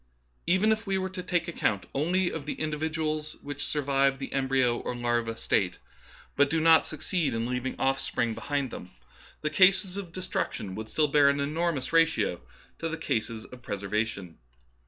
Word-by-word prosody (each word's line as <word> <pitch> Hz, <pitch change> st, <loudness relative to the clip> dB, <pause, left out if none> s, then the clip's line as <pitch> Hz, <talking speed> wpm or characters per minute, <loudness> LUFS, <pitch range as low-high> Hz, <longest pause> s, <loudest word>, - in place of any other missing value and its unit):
Even 190 Hz, +5 st, +4 dB
if 220 Hz, 0 st, -1 dB
we 195 Hz, -1 st, +1 dB
were 190 Hz, 0 st, -2 dB
to 185 Hz, -1 st, -5 dB
take 180 Hz, -1 st, 0 dB
account 105 Hz, -, 0 dB
only 175 Hz, +6 st, +1 dB
of 145 Hz, -3 st, -6 dB
the -, -, -1 dB
individuals 155 Hz, 0 st, -2 dB
which 145 Hz, 0 st, -5 dB
survive 140 Hz, -2 st, +2 dB
the 135 Hz, -, -6 dB
embryo 130 Hz, -3 st, +2 dB
or 125 Hz, -, -4 dB
larva 120 Hz, -1 st, 0 dB
state, 95 Hz, -6 st, 0 dB, 0.6 s
but 145 Hz, 0 st, +4 dB
do 160 Hz, -, +1 dB
not 160 Hz, 0 st, +6 dB
succeed 155 Hz, -2 st, -1 dB
in 115 Hz, 0 st, -1 dB
leaving 125 Hz, +1 st, -3 dB
off 135 Hz, 0 st, +2 dB
spring 115 Hz, -1 st, -1 dB
behind 130 Hz, +3 st, -2 dB
them, 90 Hz, -, -8 dB, 0.5 s
the 150 Hz, -, 0 dB
cases 190 Hz, +2 st, +4 dB
of 190 Hz, -4 st, -6 dB
destruction 175 Hz, -, -3 dB
would 110 Hz, +2 st, -6 dB
still 150 Hz, +6 st, +2 dB
bear 145 Hz, -1 st, +6 dB
an 140 Hz, 0 st, +1 dB
enormous 150 Hz, -1 st, -1 dB
ratio 165 Hz, -, +3 dB, 0.4 s
to 165 Hz, -, -2 dB
the 165 Hz, -, -3 dB
cases 115 Hz, -5 st, -2 dB
of 125 Hz, -1 st, -12 dB
pres 100 Hz, -3 st, -5 dB
ervation. 100 Hz, -4 st, -2 dB
145 Hz, 180 wpm, -28 LUFS, 120-165 Hz, 0.6 s, not